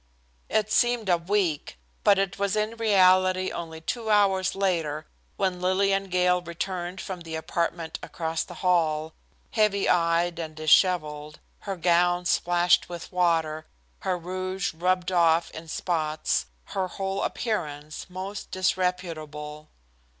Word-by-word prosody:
It 215 0 +1
seemed 240 -4 +2
a 175 - +5
week, 175 - -1 0.3
but 200 - +6
it 195 0 -1
was 200 0 +1
in 215 +1 -1
reality 185 -4 +4
only 160 -1 -6
two 225 +6 -3
hours 195 -3 +3
later 165 -6 -1 0.3
when 185 -2 -1
Lillian 195 +1 +2
Gale 180 -1 +2
returned 175 +1 -4
from 185 -2 -6
the 165 -1 -6
apartment 165 +1 -2
across 160 -1 -3
the - - -11
hall, 160 -3 +2 0.4
heavy 210 -3 +2
eyed 170 0 +2
and 160 -2 -5
dishevelled, 155 -2 +2 0.2
her 195 -2 -4
gown 175 +1 +2
splashed 175 0 +3
with 175 -1 -7
water, 165 -4 +1 0.3
her 185 -1 -1
rouge 185 +2 -3
rubbed 180 +2 0
off 170 -1 +3
in 160 +1 -9
spots, 155 -2 -1 0.3
her 190 -1 0
whole 195 +1 -3
appearance 155 -9 -3
most 190 +2 -6
disreputable. 155 -5 -2
180 Hz, 130 wpm, -26 LUFS, 165-190 Hz, 0.4 s, but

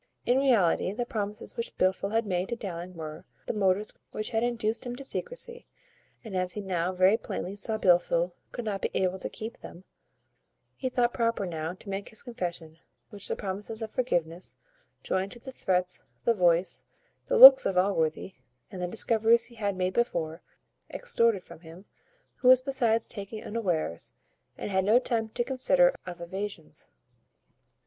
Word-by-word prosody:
In 250 +2 +3
reality, 220 -10 +3
the 240 +3 -2
promises 210 -2 -5
which 230 - -5
Blifil 190 +1 +1
had 225 +2 0
made 185 0 -1
to 235 - -1
Dowling 180 -4 -7
were 155 -1 -7 0.2
the - - -2
motives 200 0 +1 0.2
which 215 - -5
had 225 -1 +1
induced 230 -2 -1
him 245 -1 -4
to 275 - -8
secrecy; 485 - -4 0.6
and, 215 -5 -7
as 180 -1 -1
he 210 - -4
now 180 -2 -1
very 185 +3 +4
plainly 195 -3 -5
saw 220 +2 -2
Blifil 175 -2 +3 0.2
would 240 - -5
not 200 -2 -2
be - - 0
able 190 0 0
to - - -4
keep 220 +2 -7
them, 175 - -11 0.9
he 260 - -3
thought 245 -1 +1
proper 230 -4 0
now 165 0 -4
to 190 - -16
make 195 0 -4
this 220 - -8
confession, 170 -8 -6 0.3
which 205 -2 -5
the - - -2
promises 210 +3 -5
of 220 - -6
forgiveness, 175 -8 -2 0.5
joined 190 +1 -1
to 240 - -12
the 265 - -9
threats, 180 -6 -1 0.2
the 235 - +4
voice, 175 -2 +2 0.4
the - - +2
looks - - +12
of 185 - -1
Allworthy, 180 -1 +1 0.4
and 185 - -7
the 180 - -1
discoveries 225 +3 +3
he 235 - -10
had 205 -3 -1
made 185 0 0
before, 170 -8 -1 0.5
extorted 230 - +1
from - - -13
him, 170 +3 -13 0.5
who 250 - -1
was 255 0 +9
besides 245 -4 +1
taken 215 0 -6
unawares, 175 - -2 0.4
and - - -5
had 190 0 +2
no 215 +5 +5
time 230 -3 -1
to 240 - -1
consider 390 - +3
of 175 -1 -7
evasions. 190 -1 -7
205 Hz, 170 wpm, -28 LUFS, 180-235 Hz, 0.9 s, looks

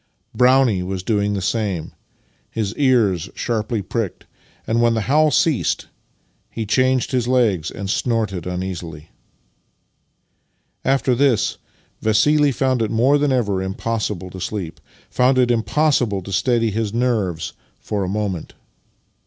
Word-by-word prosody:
Brownie 125 -6 +4
was 90 0 -4
doing 105 -1 0
the 95 - -3
same, 100 -6 -2 0.6
his 105 -2 -3
ears 115 - +2
sharply 110 -2 -2
pricked, 105 0 -4 0.4
and 115 +1 +1
when 115 -1 +3
the 110 - 0
howl 150 +7 +3
ceased 160 -4 +1 0.6
he 115 - -4
changed 130 +4 +1
his 125 -3 0
legs 110 -10 +2
and 100 - -6
snorted 105 -4 -1
imeasily. 90 -4 -5 1.7
After 135 -1 +2
this 125 -3 +1 0.4
Vassili 145 +7 +3
found 130 -1 0
it 110 - 0
more 130 +6 +3
than 145 -1 +1
ever 105 -7 0
impossible 95 -1 -3
to 95 - -8
sleep 95 -4 -5 0.2
— - - -27
found 130 +1 +3
it 125 -1 +3
impossible 115 - +1
to 100 - -8
steady 115 +4 +1
his 110 0 -2
nerves 110 -9 -1 0.3
for 105 -2 -3
a 90 - -3
moment. 100 -4 -3
110 Hz, 135 wpm, -20 LUFS, 95-125 Hz, 1.7 s, Brownie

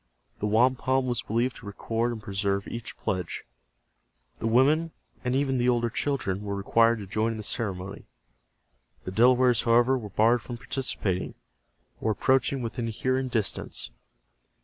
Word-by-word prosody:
The 105 - -1
wampum 130 +4 +2
was 120 -1 -1
believed 120 +2 -1
to - - -11
record 115 +3 -1
and 115 - -5
preserve 100 -1 -1
each 115 -1 -7
pledge. 90 -3 -3 1.0
The 115 - -1
women 150 +8 +3 0.3
and 125 0 0
even 135 -2 +1
the 120 +1 +3
older 120 -1 +1
children 125 -9 -1
were 100 -1 -3
required 115 +4 +3
to 105 - -7
join 110 +4 0
in - - -6
the 110 - -6
ceremony. 100 -4 -4 1.0
The 95 - -5
Delawares, 125 +2 +4
however, 120 +3 +4
were 105 -3 -7
barred 115 +4 +3
from 120 +1 -7
participating, 105 -7 -2 0.6
or 110 - -1
approaching 130 +3 +1
within 115 0 -3
hearing 130 +4 -1
distance. 115 -5 -2
115 Hz, 150 wpm, -27 LUFS, 105-130 Hz, 1.0 s, Delawares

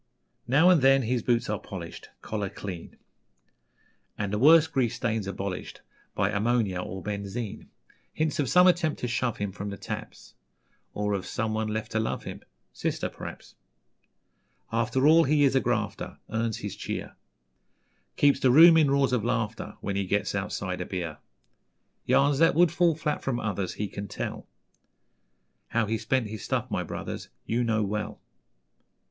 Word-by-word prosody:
Now 155 +9 +5
and 170 -5 +4
then 135 0 +5
his 120 +1 0
boots 120 +1 +1
are 105 -1 -2
polished, 85 -4 -8
Collar 105 -3 -3
clean, 90 -4 -8 1.2
And 100 -1 -3
the 105 - 0
worst 160 +4 +6
grease 120 -3 +1
stains 110 -4 -2
abolished 95 -1 -5 0.3
By 95 - +1
ammonia 105 -3 +1
or 95 0 -6
benzine: 105 +1 -5 0.4
Hints 155 -1 -1
of 140 -4 +1
some 180 +1 +6
attempt 175 -4 +2
to 125 - -1
shove 120 -1 -1
him 100 -2 -3
From 100 +1 -6
the 100 - -6
taps, - - -8 0.6
Or 105 0 -1
of 95 -2 -3
someone 110 0 -2
left 110 +1 -3
to 110 - 0
love 110 - -2
him - - -7 0.3
Sister, - - -2
p'r'aps. - - -9 1.2
After 120 +4 +1
all, 160 +2 +7
he 145 +1 +3
is 135 - +4
a - - +5
grafter, 110 -5 -2
Earns 110 0 -1
his - - -6
cheer - - -5 1.0
Keeps 140 -1 +4
the 130 - +3
room 165 +5 +8
in 155 -3 +4
roars 135 -2 +2
of 120 -4 +1
laughter 115 -2 -2
When 100 - -3
he 100 0 0
gets - - 0
outside - - -3
a - - -3
beer. 85 -5 -4 0.9
Yarns 140 0 +3
that 165 -3 +5
would 175 0 +5
fall 170 -2 +3
flat 150 -1 -2
from 125 -3 -1
others 100 -4 -3
He 105 - -2
can 100 +1 -6
tell; - - -5 1.2
How 115 -1 +1
he 110 +1 -1
spent 130 0 0
his 105 0 -7
'stuff', - - -2
my - - 0
brothers, - - -6 0.2
You 120 +2 0
know 110 -2 +1
well. 105 +1 -3
115 Hz, 165 wpm, -27 LUFS, 105-135 Hz, 1.2 s, room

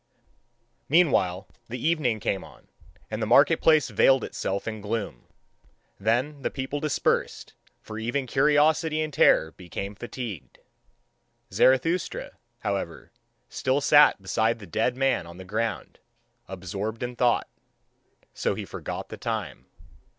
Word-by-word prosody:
Meanwhile 120 - +3 0.2
the 125 - -4
evening 135 -6 0
came 95 -1 -2
on, - - -17 0.4
and 110 +1 -3
the 110 - -1
market 140 +7 +5
place 155 -2 +4
veiled 135 -2 +4
itself 100 +2 -3
in 110 -1 -4
gloom. 100 - -4 0.7
Then 125 +8 0
the - - -1
people 135 +2 -4
dispersed, 150 0 -1 0.3
for 110 0 -7
even 120 +4 -2
curiosity 150 +4 +2
and 155 -1 -3
terror 80 - +4
become 95 +3 -7
fatigued. 115 - -7 1.0
Zarathustra, 165 +8 +2 0.3
however, - - -4 0.4
still 130 +2 0
sat 145 -3 +6
beside 110 +4 0
the 105 - -11
dead 110 +8 -1
man 135 -10 +1
on 85 +1 -11
the 95 - -10
ground, 110 +2 -3 0.5
absorbed 95 +5 -5
in 120 0 -4
thought: 120 -1 +2 0.9
so - - -1
he - - -5
forgot - - -6
the - - -8
time. - - -4
120 Hz, 130 wpm, -26 LUFS, 100-140 Hz, 1.0 s, sat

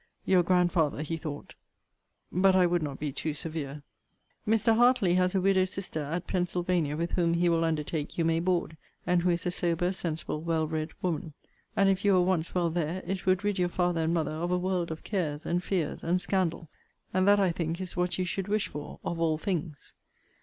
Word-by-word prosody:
Your 185 -2 +5
grandfather, 175 -4 +2
he 165 +2 -3
thought 150 -2 -7 0.8
But 185 +1 +4
I 185 -1 +5
would 175 0 +1
not 145 -3 -4
be 150 -1 -2
too 150 +2 -3
severe. 150 -2 -5 0.6
Mr. 225 +1 +3
Hartley 240 -6 +4
has 180 +1 +2
a 190 - +3
widow 190 0 +4
sister 185 -4 -4
at 165 +5 -3
Pensylvania, 175 -4 0
with 170 +1 -2
whom 170 -2 +2
he 175 +1 +3
will 165 -1 +2
undertake 155 -1 -2
you 165 - +1
may 165 0 +2
board, 175 -2 0 0.3
and 175 0 +2
who 180 - +1
is 175 +1 0
a 180 - +1
sober, 175 0 0
sensible, 165 -4 -3
well 165 -1 0
read 155 0 -2
woman. 165 -3 -2 0.4
And 195 - +4
if 195 0 +2
you 200 -1 +4
were 180 -1 +5
once 180 -2 0
well 175 -2 +1
there, 170 +2 -2
it 190 -1 -4
would 185 +1 +3
rid 205 -2 0
your 180 -1 +2
father 175 -1 0
and 160 +1 +1
mother 155 -3 0
of 165 +3 -3
a 180 - +2
world 180 -1 -1
of 160 0 -6
cares, 155 -7 -2
and 175 +1 0
fears, 180 -6 -2
and 175 +2 +1
scandal; 180 -3 -1 0.5
and 185 +1 +2
that 205 0 +6
I 190 -3 +3
think 165 0 -3
is 185 -1 -6
what 180 0 0
you 185 - 0
should 195 +1 -3
wish 210 0 0
for 150 0 -8
of 170 - -3
all 160 -2 +2
things. 160 -5 -4
175 Hz, 210 wpm, -29 LUFS, 160-185 Hz, 0.8 s, that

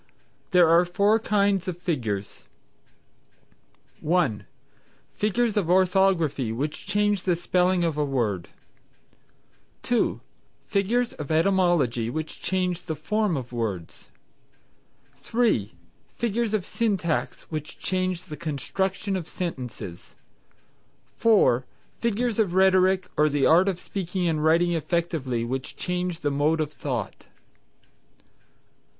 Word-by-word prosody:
There 180 -2 +5
are 165 +2 +6
four 200 +5 +2
kinds 200 -4 +1
of 180 -2 -3
figures, 115 - -3 1.5
viz.: - - -30
(1) 155 - +1 0.7
Figures 215 +2 0
of 185 -5 +1
Orthography 180 - +2
which 145 +10 -4
change 205 -1 +1
the 180 -2 +1
spelling 180 +1 +1
of 165 -3 -1
a 150 - +2
word; 115 -10 -1 1.4
(2) - - +1 0.5
Figures 230 +5 0
of 150 - -7
Etymology 160 - +2
which 155 +4 -5
change 180 -1 -1
the 160 - -3
form 205 +3 0
of 125 -2 -6
words; 100 -8 -4 1.1
(3) 220 - 0 0.4
Figures 230 -1 0
of 195 -4 -2
Syntax 195 -8 -1
which 155 -1 -5
change 185 -1 -1
the 150 - -8
construction 190 +6 -2
of 175 -4 -4
sentences; 125 - -6 1.0
(4) 195 - +4 0.4
Figures 235 0 0
of 190 -5 +1
Rhetoric 190 -1 +4
or 150 0 +4
the 145 -2 +1
art 180 +4 +5
of 180 -2 -3
speaking 180 -2 -3
and 155 -2 0
writing 170 +2 +3
effectively 160 -7 -1
which 130 +2 -4
change 180 -1 -3
the 145 -2 0
mode 150 +3 +1
of 155 -1 -2
thought. 125 -10 -5
175 Hz, 115 wpm, -25 LUFS, 145-190 Hz, 1.5 s, are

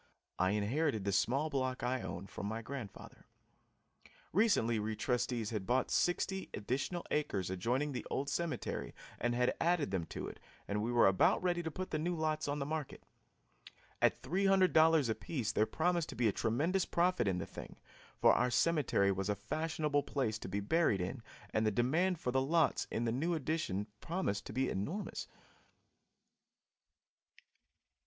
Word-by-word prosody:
I 95 - +3
inherited 110 +2 0
the 100 - +1
small 135 +10 +1
block 130 -2 -1
I 125 0 0
own 95 0 -5
from 100 - -6
my 110 +2 -4
grandfather. 120 -5 -8 1.1
Recently 155 - +3
we 110 +1 -2
trustees 120 -2 -1
had 105 -4 -3
bought 130 +2 +1
sixty 190 +2 0
additional 135 - -2
acres 100 -12 -1
adjoining 125 +10 0
the 125 -4 -4
old 140 +1 -1
cemetery 170 +3 -3 0.2
and 120 +1 0
had 125 0 +2
added 170 - +2
them 90 -4 -1
to - - -5
it, - - -9 0.3
and 105 +1 -1
we 115 +3 -1
were 120 -1 +5
about 95 - +4
ready 175 -1 +1
to 165 - -3
put 185 +4 -5
the 155 - 0
new 175 +3 -1
lots 155 -2 -1
on 145 0 -1
the 140 - -2
market. 155 -1 -4 1.0
At - - +2
$300 180 -6 +4
apiece 115 +1 -2
there 110 - +2
promised 170 0 0
to - - -6
be 120 -1 +2
a - - +3
tremendous 155 - +1
profit 175 - +1
in 95 -2 +1
the - - -3
thing, - - -9 0.4
for - - +6
our 125 - +2
cemetery 125 -7 +2
was 95 +1 -2
a 105 - +1
fashionable 150 +7 -1
place 120 -7 -2
to 95 - -7
be 100 +2 -2
buried 110 - +2
in 95 +8 -3 0.3
and 110 - +1
the 110 - +3
demand 155 - +1
for 125 - -1
the 130 +1 +2
lots 155 +2 +2
in 115 - -1
the 115 - +1
new 160 +8 0
addition 155 - -1
promised 165 - -2
to - - -6
be 130 +4 0
enormous. 160 - -3
130 Hz, 170 wpm, -34 LUFS, 110-160 Hz, 1.1 s, for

